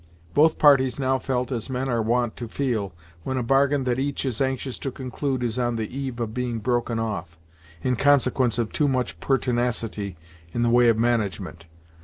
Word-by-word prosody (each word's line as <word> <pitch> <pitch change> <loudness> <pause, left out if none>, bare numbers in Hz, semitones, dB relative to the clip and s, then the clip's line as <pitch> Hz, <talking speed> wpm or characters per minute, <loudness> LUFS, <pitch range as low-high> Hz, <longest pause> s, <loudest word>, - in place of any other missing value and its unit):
Both 160 +1 +4
parties 135 -3 +5
now 130 -1 +1
felt 125 -1 -2
as 120 0 -3
men 130 +1 -2
are 120 -3 +1
wont 120 +1 0
to 120 - -5
feel, 115 -6 -2 0.3
when 130 +9 -3
a 125 - 0
bargain 135 +2 +3
that 125 0 0
each 140 +1 -2
is 125 -3 -2
anxious 130 -1 -2
to 135 - -3
conclude 130 0 -3
is 120 +1 -1
on 120 -1 0
the 110 +2 -4
eve 135 -3 -4
of 115 -2 -3
being 125 -1 -2
broken 120 +1 -1
off, 100 -7 -4 0.5
in 125 - +1
consequence 130 -3 +3
of 115 -2 -1
too 150 - +1
much 130 -2 -1
pertinacity 120 -7 -1 0.4
in 120 - 0
the 120 - +2
way 120 0 +5
of 115 - +3
management. 105 -7 -1
125 Hz, 190 wpm, -24 LUFS, 115-130 Hz, 0.5 s, parties